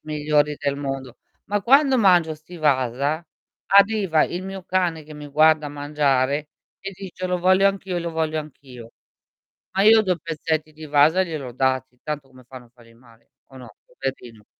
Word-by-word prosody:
migliori 150 0 +1
del 140 -1 -1
mondo, 135 -3 -6 0.3
ma 205 -1 -2
quando 270 +2 +4
mangio 175 -6 +4
sti 160 +3 -14
Wasa, 140 +2 0 0.4
arriva 200 -5 +4
il 180 +2 -5
mio 190 -1 -7
cane, 175 -4 -1
che 155 0 -12
mi 150 0 -9
guarda 155 0 +3
mangiare 145 0 0 0.3
e 195 - -6
dice: 185 -1 -7
"Lo 180 0 0
voglio 185 +2 +4
anch'io 195 -1 -4
e 175 - -1
lo 170 0 -4
voglio 160 -1 -1
anch' 150 -2 -12
io". 120 -4 -12 0.9
Ma 195 - +3
io 220 +1 +7
2 185 -4 -1
pezzetti 155 -1 -3
di 155 - -13
Wasa 150 +5 +4
gliel'ho 145 -8 -6
dati, 130 0 -1
tanto 150 -3 -5
come 130 -1 -18
fanno 125 0 -12
a - - -24
fargli 115 -1 -20
male 115 -1 -23
o 135 - -19
no, 125 -5 -12
poverino. 125 -5 -7
155 Hz, 175 wpm, -22 LUFS, 135-180 Hz, 0.9 s, io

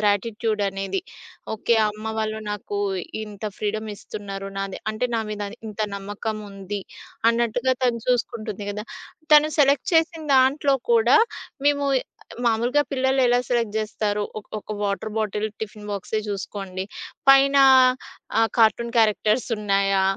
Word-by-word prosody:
Gratitude 210 +1 0
అనేది. 195 - -3 0.5
Okay. 230 +2 +1
అమ్మ 215 +1 -8
వాళ్ళు 220 0 -2
నాకు 205 0 -4 0.5
ఇంత 210 0 -10
ఫ్రీడమ్ 215 +1 -2
ఇస్తున్నారు. 195 -1 -7
నాది 195 -1 -4
అంటే 250 +3 -1
నా - - +1
మీద 210 -1 -4 0.3
ఇంత 215 +1 -7 0.2
నమ్మకం 205 +2 -4
ఉంది, 195 +1 -5 0.5
అన్నట్టుగా 240 +2 +1
తను 235 -2 +1
చూసుకుంటుంది 220 -4 -1
గదా! 210 +1 -5 0.5
తను 300 0 +8
సెలెక్ట్ 280 0 +3
చేసిన 325 0 +2
దాంట్లో 275 +2 +4 0.2
కూడా 230 +2 +5 0.5
మేము 285 -1 +3 0.6
మామూలుగా 240 +5 +2
పిల్లలు 265 0 +2
ఎలా 245 0 +4
సెలెక్ట్ 230 -3 0
జేస్తారు? 210 -1 -1 0.2
ఒక 210 - -12
ఒక 210 - -12
వాటర్ 200 +2 -2
బాటిల్ 215 0 -1
టిఫిన్ 210 -1 -7
బాక్సే 205 +2 -2
జూసుకోండి. 195 -1 -4 0.4
పైన 275 +1 +7 0.8
ఆహ్, 225 0 +4
కార్టూన్ 230 +1 +3
క్యారెక్టర్స్ 215 +1 +3
ఉన్నాయా, 195 -2 +2
215 Hz, 130 wpm, -23 LUFS, 205-240 Hz, 0.8 s, తను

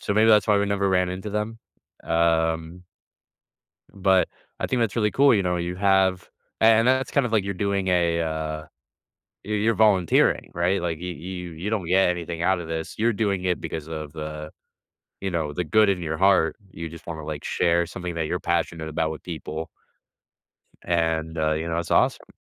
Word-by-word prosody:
so, 100 - -2
maybe 110 +1 +4
that's 105 0 +5
why 105 -1 +4
we 100 - +1
never 100 -1 0
ran 90 -1 +2
into 95 +3 -5
them, 105 +2 -3 0.5
um 80 +1 0 1.1
But 95 -1 +2 0.3
I - - 0
think 125 -2 0
that's 115 0 0
really 105 -2 +2
cool, 140 -3 +5
you 100 - +2
know, 90 -1 0
you 90 +1 -3
have 95 -1 +2 0.3
a - - +3
and 115 +1 +5
that's 130 +1 +2
kind 140 -3 +2
of 115 - -6
like 105 -3 +2
you're 100 -1 -3
doing 100 -1 -1
a, 85 -2 +2
uh 80 -1 -3 0.8
you 105 +1 -3
you're 110 +2 +2
volunteering, 100 -6 +3
right? 90 +3 +1
Like 85 -3 -2
you 90 +1 -5
you 90 0 -7
you 90 +7 -5
don't 105 -6 -1
get 95 +2 +4
anything 85 -1 -4
out 95 0 +2
of 80 - -7
this, 80 0 -4
you're 115 +2 +2
doing 100 -3 -1
it 90 -1 0
because 80 -1 -5
of 75 -2 -6
the 75 -1 -6 0.7
you 95 -1 -2
know, 80 -4 -2
the 90 - -2
good 105 +6 +4
in 95 -3 0
your 80 -1 -3
heart. 95 -3 +3 0.2
You 85 0 -6
just 85 +1 -12
wanna, 80 -2 -5
like, 75 -1 -5
share 85 0 +1
something 90 0 -6
that 80 -2 -1
you're 90 - -2
passionate 85 -2 -1
about 80 0 -1
with 80 - -8
people. 80 -1 -6 1.1
And, 80 -1 0
uh, 80 0 +2
you 80 +2 -2
know, 85 - -1
it's 85 - -4
awesome. - - +2
90 Hz, 200 wpm, -24 LUFS, 80-100 Hz, 1.1 s, that's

